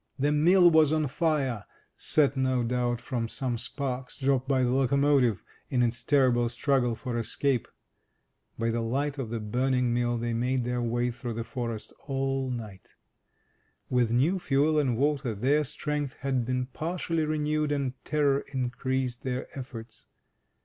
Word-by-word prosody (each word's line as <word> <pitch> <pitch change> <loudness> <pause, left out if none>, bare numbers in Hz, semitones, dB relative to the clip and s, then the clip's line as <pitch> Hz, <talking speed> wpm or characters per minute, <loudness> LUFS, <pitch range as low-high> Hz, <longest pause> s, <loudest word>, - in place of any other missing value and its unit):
The 145 +2 +1
mill 175 +4 +6
was 160 -2 +5
on 155 -1 +2
fire, 135 -6 0 0.3
set, 145 -2 +2
no 130 -2 +1
doubt, 120 0 0
from 120 -3 -3
some 120 0 -2
sparks 125 0 -4
dropped 135 -1 +1
by 130 -2 +2
the 125 - +2
locomotivean 135 -3 +3 0.3
its 120 -2 +1
terrible 125 -4 +3
struggle 125 -1 +1
for 120 0 -3
escape. 130 +2 0 0.9
By 115 0 0
the 115 0 -1
light 140 +5 -1
of 125 -5 -3
the 115 0 -3
burning 125 +3 0
mill 120 0 +1
they 120 0 -2
made 125 +2 0
their 125 0 -1
way 120 +1 0
through 120 0 -5
the 115 +1 -3
forest 115 -3 -5
all 135 -1 -1
night. 110 -6 -7 1.0
With 125 -2 +3
new 140 +11 +2
fuel 150 -1 +2
and 130 -6 +1
water 140 -4 0
their 140 +8 +2
strength 150 -1 -3
had 130 -3 0
been 125 0 0
partially 165 +4 -2
renewed, 150 0 0
and 140 -3 -1
terror 145 -2 +1
increased 130 -1 -2
their 130 -1 -4
efforts. 115 -4 -9
130 Hz, 150 wpm, -28 LUFS, 120-145 Hz, 1.0 s, mill